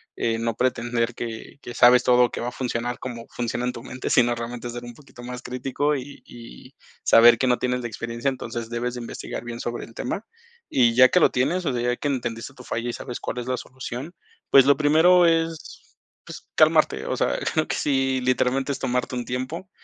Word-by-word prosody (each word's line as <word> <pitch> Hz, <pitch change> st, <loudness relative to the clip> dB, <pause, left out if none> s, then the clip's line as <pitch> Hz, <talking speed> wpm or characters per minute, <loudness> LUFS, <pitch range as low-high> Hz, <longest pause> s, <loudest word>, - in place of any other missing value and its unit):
Eh, 115 Hz, -1 st, -1 dB
no 115 Hz, -1 st, -1 dB
pretender 120 Hz, -1 st, 0 dB
que 115 Hz, +3 st, -7 dB
que 120 Hz, -, -8 dB
sabes 125 Hz, +2 st, +6 dB
todo, 125 Hz, -1 st, +4 dB
que -, -, -5 dB
va 120 Hz, -, -3 dB
a -, -, -3 dB
funcionar 120 Hz, -1 st, -3 dB
cómo 120 Hz, -2 st, -7 dB
funciona 120 Hz, 0 st, -3 dB
en 125 Hz, -, -1 dB
tu 115 Hz, -, -9 dB
mente, 130 Hz, 0 st, -6 dB
sino, 120 Hz, -1 st, +4 dB
realmente 120 Hz, 0 st, -5 dB
ser 120 Hz, 0 st, -7 dB
un 120 Hz, -, -9 dB
poquito 135 Hz, -3 st, -15 dB
más 125 Hz, 0 st, -7 dB
crítico 135 Hz, +4 st, -1 dB
y 140 Hz, +1 st, -8 dB
y 115 Hz, -, -13 dB, 0.3 s
saber 115 Hz, 0 st, +7 dB
que -, -, 0 dB
no 125 Hz, -1 st, +2 dB
tienes 125 Hz, 0 st, -1 dB
la 120 Hz, -, -3 dB
experiencia. 115 Hz, +4 st, -3 dB
Entonces, 120 Hz, -3 st, -5 dB
debes 120 Hz, +1 st, -3 dB
de 125 Hz, -, -5 dB
investigar 120 Hz, -, -6 dB
bien 120 Hz, 0 st, -7 dB
sobre 120 Hz, 0 st, -4 dB
el 115 Hz, -, -16 dB
tema. 195 Hz, -, -4 dB, 0.4 s
Y, 120 Hz, -3 st, +3 dB
ya 130 Hz, +1 st, +7 dB
que 180 Hz, -, +4 dB
lo -, -, +5 dB
tienes, 170 Hz, +9 st, 0 dB
o 135 Hz, -, +1 dB
sea, 120 Hz, -, -1 dB
ya 125 Hz, 0 st, 0 dB
que -, -, -3 dB
entendiste 120 Hz, -3 st, -3 dB
tu 125 Hz, -, -12 dB
falla 120 Hz, 0 st, -3 dB
y 120 Hz, -, -3 dB
sabes 125 Hz, -2 st, -6 dB
cuál -, -, -5 dB
es 120 Hz, -, -6 dB
la 130 Hz, 0 st, -1 dB
solución, 130 Hz, +5 st, -7 dB, 0.4 s
pues, 135 Hz, -1 st, +7 dB
lo 140 Hz, -1 st, +5 dB
primero 160 Hz, +5 st, +5 dB
es, 165 Hz, -1 st, -2 dB, 0.3 s
pues, -, -, -10 dB
calmarte, -, -, +3 dB
o -, -, -2 dB
sea, -, -, +1 dB, 0.2 s
creo 155 Hz, 0 st, +1 dB
que -, -, -2 dB
sí 135 Hz, -2 st, 0 dB
literalmente, 130 Hz, +2 st, +1 dB
es 140 Hz, -, -4 dB
tomarte 125 Hz, 0 st, -1 dB
un 120 Hz, -1 st, -3 dB
tiempo, 130 Hz, +10 st, -5 dB
125 Hz, 220 wpm, -24 LUFS, 120-135 Hz, 0.4 s, saber